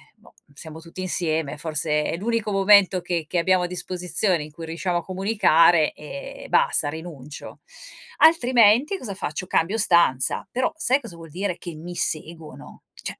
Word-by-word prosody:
boh, - - -22 0.2
siamo 160 +2 -10
tutti 165 +2 -12
insieme, 160 -5 0
forse 150 0 -1
è 165 - -3
l'unico 220 +2 -2
momento 195 -1 +4
che 170 -2 -3
che 175 - -3
abbiamo 185 +1 +2
a - - -1
disposizione 180 0 -1
in 150 - -11
cui 165 +2 -9
riusciamo 170 +2 -2
a 175 - -4
comunicare, 180 -5 +3
e - - -9
basta, 475 - +2
rinuncio. 150 -3 -9 0.6
Altrimenti, 255 - +4
cosa 210 - -6
faccio, 180 0 -5
cambio 180 +7 0
stanza. 170 - +2
Però, 255 +6 -1
sai 275 -4 +2
cosa 225 -9 -10
vuol 165 -2 -13
dire 185 +1 -3
che 175 - -8
mi 175 +3 -9
seguono? 160 -1 -5
Cioè, - - -8
175 Hz, 160 wpm, -23 LUFS, 160-210 Hz, 0.6 s, momento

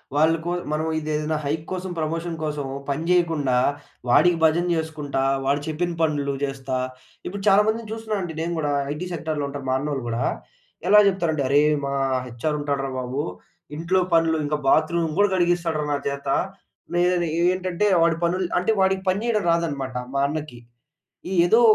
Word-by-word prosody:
వాళ్ళకో 160 +3 +2 0.2
మనం 155 +1 0
ఇదేదైనా 155 0 -1
హైక్ 155 +2 -2
కోసం 185 0 -3
ప్రమోషన్ 165 +2 -2
కోసమో 145 -3 -3
పనిజేయకుండా, 160 -3 +1 0.5
వాడికి 175 +7 +5
భజన 160 +2 +4
జేసుకుంటా, 155 -4 -2 0.2
వాడు 140 +1 +1
చెప్పిన 170 +3 -1
పనులు 145 -3 +1
జేస్తా, 135 -2 -2 0.5
ఇప్పుడు 200 +2 -5
చాలామందిని 215 +3 +3
చూస్తున్నానండి 215 -7 -3
నేను 170 +1 -2
గూడా, 145 -2 0 0.2
ఐటీ 170 +5 -5
సెక్టార్‌లో 155 -3 -2
ఉంటారు, 140 -1 -7
మా 130 - +2
అన్నోళ్ళు 140 -2 -3
గూడా. 115 0 -1 0.6
ఎలా 210 +2 +8
చెప్తారంటే, 170 -6 0
అరేయ్! 150 +2 +4
మా 140 - -2 0.3
హెచ్ఆర్ 125 +6 -2
ఉంటాడురా 140 -2 -2
బాబు, 130 +2 -2 0.6
ఇంట్లో 170 +4 +1
పనులు, 165 -1 +4
ఇంక 150 +1 0
బాత్రూమ్ 160 +2 +2
గూడా 205 0 +5
కడిగిస్తాడురా, 170 -3 +1
నా 145 - +1
చేత. 140 0 -6 0.7
నేనని 175 0 +2
ఏ - - +2
ఏంటంటే, 185 +2 -1 0.2
వాడి 165 -1 +2
పనులు 180 +2 0
అంటే, 180 +5 +1
వాడికి 190 0 +2
పని 195 +4 0
జేయడం 220 -4 +1
రాదనమాట, 145 -6 -1 0.2
మా 140 - +1
అన్నకి. 150 -5 -5 0.9
ఏదో 225 +6 +5
160 Hz, 150 wpm, -23 LUFS, 145-175 Hz, 0.9 s, ఎలా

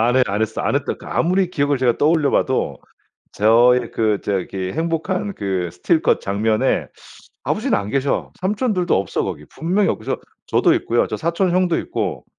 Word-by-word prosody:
안 120 +2 +2
해 130 - +5
안 100 +2 -1
했어 110 0 -2
안 - - 0
했다 145 - -2
그 - - -14
아무리 185 +1 +1
기억을 145 -4 +1
제가 125 -2 +2
떠올려 155 -1 +3
봐도 130 - 0 0.5
저의 120 +3 +4
그 110 -2 +1
저기 95 -1 -3
행복한 165 +5 -2
그 95 -4 -2
스틸컷 155 - +1
장면에 110 +2 0 0.6
아버지는 - - 0
안 100 0 -4
계셔. 140 +2 -1
삼촌들도 200 -2 +1
없어 95 - -2
거기. - - -5
분명히 185 +5 0
없어. - - -2 0.3
저도 - - +3
있고요. 120 - +1
저 - - -4
사촌 170 +3 0
형도 180 -2 +2
있고 - - -4
140 Hz, 335 characters per minute, -20 LUFS, 110-170 Hz, 0.6 s, 해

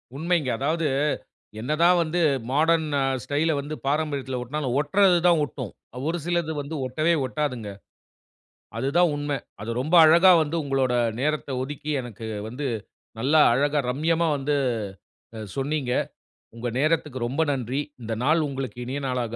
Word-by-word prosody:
உண்மைங்க. 160 -2 0
அதாவது 155 +3 0 0.7
என்னதான் 165 +8 +3
வந்து 165 +2 -2 0.3
மாடர்ன் 160 +3 +3 0.4
ஸ்டைல 150 +6 0
வந்து 150 +2 -6
பாரம்பரியத்துல 140 -3 -1
ஒட்டுனாலும் 130 0 -3
ஒட்டுறது 185 +4 +4
தான் 170 -3 +4
ஒட்டும். 135 - -7 0.4
ஒரு 170 +2 0
சிலது 170 -2 0
வந்து 145 +3 -6
ஒட்டவே 155 +7 +1
ஒட்டாதுங்க. 130 -6 -3 1.1
அதுதான் 150 +8 +2
உண்மை. 145 -1 -2 0.2
அது 110 +2 -4
ரொம்ப 155 +7 +1
அழகா 170 +4 +7
வந்து 155 +2 -4
உங்களோட 135 -3 0 0.3
நேரத்த 150 0 -1
ஒதுக்கி 145 +3 -6
எனக்கு 115 -2 -8 0.2
வந்து 130 +5 -4 0.5
நல்லா 145 +6 +3
அழகா 145 +3 +2
ரம்யமா 165 +5 +1
வந்து 145 +2 -1 0.8
அ - - -6 0.2
சொன்னீங்க. 140 -1 -1 0.6
உங்க 115 +1 -4
நேரத்துக்கு 150 -3 0
ரொம்ப 135 +6 -1
நன்றி. 130 +1 -2 0.2
இந்த 115 0 -3
நாள் 155 +3 +3
உங்களுக்கு 135 -2 -5
இனிய 135 +3 -3
நாளாக 125 -3 -2
145 Hz, 135 wpm, -25 LUFS, 130-160 Hz, 1.1 s, அழகா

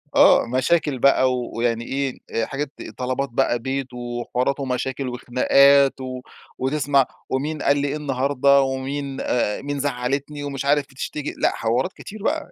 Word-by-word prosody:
آه، - - +6
مشاكل 130 +3 +1
بقى 130 -1 +4
ويعني 120 -1 -2
إيه، 135 0 -2 0.3
حاجات، 140 0 -4 0.3
طلبات 130 +2 -2
بقى 120 0 +1
بيت، 130 +1 -3
وحوارات 120 +2 -2
ومشاكل 130 0 -2
وخناقات، 135 +3 +4
و 130 -1 -5 0.4
وتسمع 140 0 +2 0.2
ومين 145 +3 -2
قال 140 - +3
لي 145 0 0
إيه 140 - -2
النهارده، 140 -1 +2
ومين 135 +1 -3
آآ، 105 -4 0
مين 145 0 -3
زعلتني 140 +2 -2
ومش 140 -1 -4
عارف 145 0 +3
بتشتكي، 140 +2 -5
لأ، - - +2
حوارات 120 +9 0
كتير 210 0 -10
بقى. 315 +4 -1
135 Hz, 145 wpm, -22 LUFS, 125-140 Hz, 0.4 s, آه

